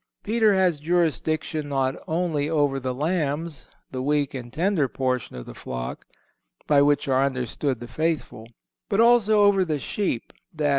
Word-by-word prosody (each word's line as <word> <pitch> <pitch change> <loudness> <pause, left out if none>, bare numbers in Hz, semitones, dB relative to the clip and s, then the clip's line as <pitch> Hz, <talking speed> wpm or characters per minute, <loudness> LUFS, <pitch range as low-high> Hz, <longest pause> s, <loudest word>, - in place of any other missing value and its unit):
Peter 220 -1 +3
has 180 -5 +2
jurisdiction 155 -1 0
not 135 -1 0
only 160 -3 0
over 145 -4 +1
the 130 0 -3
lambs—the 150 -2 -3
weak 145 +1 0
and 120 -3 -7
tender 165 -1 +1
portion 130 - -2
of - - -7
the - - -9
flock—by 65 - -4
which 145 0 +2
are 135 0 +3
understood 130 0 -2
the 120 - -8
faithful; 155 -5 -2 0.4
but 200 - +1
also 225 -3 +5
over 200 -2 +4
the 155 -4 -1
sheep, 145 - -3 0.2
_i. 150 -1 +1
150 Hz, 145 wpm, -24 LUFS, 135-175 Hz, 0.4 s, also